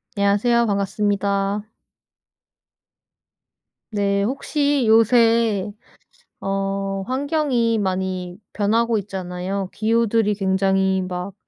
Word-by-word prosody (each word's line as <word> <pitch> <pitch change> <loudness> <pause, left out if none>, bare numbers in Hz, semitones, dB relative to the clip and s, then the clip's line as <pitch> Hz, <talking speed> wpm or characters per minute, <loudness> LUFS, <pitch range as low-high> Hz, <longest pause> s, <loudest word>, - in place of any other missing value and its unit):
안녕하세요 205 +4 +2
반갑습니다. 200 0 0 2.3
네 200 -1 0
혹시 280 +3 0
요새 225 -2 +3 0.7
어 195 0 -2
환경이 260 -4 0
많이 185 -2 -3 0.2
변하고 225 +2 +1
있잖아요. 190 0 -4
기후들이 225 -1 +1
굉장히 190 -1 +1
막 180 +1 -5
200 Hz, 190 characters per minute, -21 LUFS, 195-230 Hz, 2.3 s, 요새